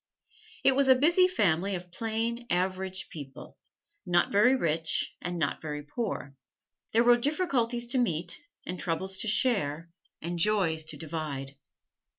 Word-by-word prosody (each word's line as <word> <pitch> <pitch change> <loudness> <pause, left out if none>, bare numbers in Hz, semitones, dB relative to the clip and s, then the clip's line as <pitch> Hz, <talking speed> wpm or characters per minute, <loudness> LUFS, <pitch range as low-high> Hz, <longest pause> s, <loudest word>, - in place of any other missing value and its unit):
It 270 - +6
was 275 +1 +2
a 260 - +8
busy 340 +7 +5
family 195 - +1
of 180 0 -8
plain, 230 +3 -2
average 185 +1 -1
people 140 -2 -10 0.4
not 175 -2 +2
very 210 +6 +5
rich, 160 -7 0
and 180 0 -3
not 150 -4 -1
very 150 -1 -5
poor. 145 - -4 0.6
There 230 +2 +4
were 240 0 +6
difficulties 245 -4 0
to 255 - +1
meet, 175 -7 -1 0.3
and 180 0 -5
troubles 190 +3 -2
to 225 - -1
share, 170 - +2 0.3
and 170 +1 -4
joys 165 -5 +2
to 160 - -6
divide. 150 -4 -4
185 Hz, 145 wpm, -29 LUFS, 160-235 Hz, 0.6 s, a